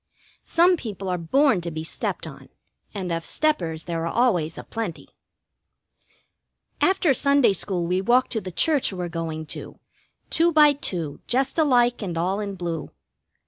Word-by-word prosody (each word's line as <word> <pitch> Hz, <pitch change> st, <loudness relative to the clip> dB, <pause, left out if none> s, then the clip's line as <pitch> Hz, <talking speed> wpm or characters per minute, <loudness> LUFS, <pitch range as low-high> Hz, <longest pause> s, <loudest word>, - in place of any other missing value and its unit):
Some 350 Hz, +2 st, +4 dB
people 200 Hz, -, -6 dB
are 180 Hz, -, 0 dB
born 225 Hz, -, +2 dB
to 170 Hz, -, -4 dB
be 155 Hz, -1 st, -5 dB
stepped 160 Hz, -, -4 dB
on, -, -, -11 dB, 0.4 s
and 190 Hz, -4 st, -4 dB
of 165 Hz, 0 st, -2 dB
steppers 170 Hz, -, 0 dB
there 165 Hz, -1 st, -3 dB
are -, -, -3 dB
always 180 Hz, -10 st, +1 dB
a -, -, -7 dB
plenty. 225 Hz, -7 st, -6 dB, 1.7 s
After 375 Hz, -6 st, +3 dB
Sunday 280 Hz, -4 st, +4 dB
school 180 Hz, -1 st, -1 dB
we 180 Hz, +2 st, 0 dB
walk 245 Hz, +5 st, +3 dB
to 220 Hz, -, -2 dB
the 185 Hz, -, -7 dB
church 290 Hz, -, +2 dB
we're 180 Hz, -2 st, -4 dB
going 165 Hz, -2 st, -4 dB
to, -, -, -9 dB, 0.5 s
two 335 Hz, +1 st, +3 dB
by 300 Hz, -2 st, +6 dB
two, 170 Hz, -, -4 dB
just 265 Hz, +5 st, 0 dB
alike 245 Hz, -6 st, +3 dB
and 175 Hz, -5 st, -4 dB
all 185 Hz, +4 st, 0 dB
in 200 Hz, -2 st, -4 dB
blue. 170 Hz, -4 st, -4 dB
195 Hz, 160 wpm, -24 LUFS, 170-270 Hz, 1.7 s, by